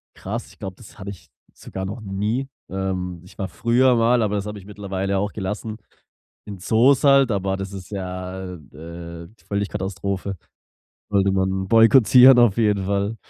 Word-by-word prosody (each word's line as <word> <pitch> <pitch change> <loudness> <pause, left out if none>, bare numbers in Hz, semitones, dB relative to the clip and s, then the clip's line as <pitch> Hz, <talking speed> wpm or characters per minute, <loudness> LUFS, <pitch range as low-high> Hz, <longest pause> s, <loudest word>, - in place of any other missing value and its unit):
krass.“ - - -5
Ich - - -19
glaube, 95 -1 -6
das 115 - -16
hatte 100 +1 -6
ich 90 -3 -13 0.3
sogar 95 0 -7
noch 110 +4 -6
nie. 105 +7 -2 0.2
Ähm, 90 -2 -3
ich 90 - -17
war 95 - -3
früher 120 +6 +2
mal- 115 +1 +3
aber 105 0 0
das 100 0 -2
habe 105 0 -6
ich 95 - -15
mittlerweile 100 -1 -3
auch 100 +1 -2
gelassen- 105 +2 -5 0.7
in 100 -2 -8
Zoos 120 +9 +3
halt, 135 -3 +5
aber 95 -1 -1
das 95 0 -6
ist 95 0 -9
ja, 95 -1 -5
äh, 90 -1 -7 0.7
äh, 85 - -13 0.2
völlig 100 0 -2
Katastrophe. 95 +1 -4 0.8
Sollte 100 -1 +2
man 95 0 0
boykottieren 125 +3 +7
auf 120 -4 +4
jeden 105 -4 +2
Fall. 100 +3 -1
100 Hz, 170 wpm, -22 LUFS, 95-110 Hz, 0.8 s, boykottieren